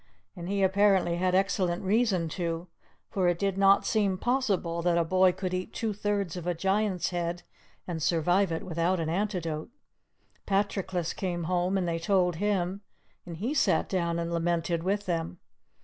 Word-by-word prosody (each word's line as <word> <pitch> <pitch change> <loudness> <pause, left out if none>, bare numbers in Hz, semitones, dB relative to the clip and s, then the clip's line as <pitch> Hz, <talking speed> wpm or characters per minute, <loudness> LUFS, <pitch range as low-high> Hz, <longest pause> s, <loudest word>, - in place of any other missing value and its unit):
And 175 0 -6
he 200 0 +1
apparently 190 -2 +3
had 185 +1 +1
excellent 190 -2 +1
reason 195 -4 +2
to; 170 0 -3 0.4
for 185 -3 +1
it 175 -1 +2
did 195 0 0
not 195 0 +4
seem 200 -4 +1
possible 200 -9 0
that 170 0 +2
a 170 - +3
boy 185 +2 +4
could 185 0 -4
eat 185 0 -4
two 220 -2 -1
thirds 200 -3 -2
of 175 -1 -6
a 175 - 0
Giant's 195 +1 0
head 175 0 -3 0.4
and 170 -3 -4
survive 175 +4 +2
it 165 - -2
without 170 +1 0
an 160 -1 -1
antidote. 175 -4 -2 0.8
Patroclus 195 -3 -1
came 175 -3 -3
home, 180 +3 0
and 180 -2 -1
they 165 0 -1
told 180 -1 +1
him, 195 -1 -1 0.5
and 170 -2 -7
he 230 - -2
sat 305 - +2
down 170 -3 -1
and 170 0 -2
lamented 170 0 0
with 200 +3 -1
them. 170 -1 -2
180 Hz, 170 wpm, -28 LUFS, 170-195 Hz, 0.8 s, not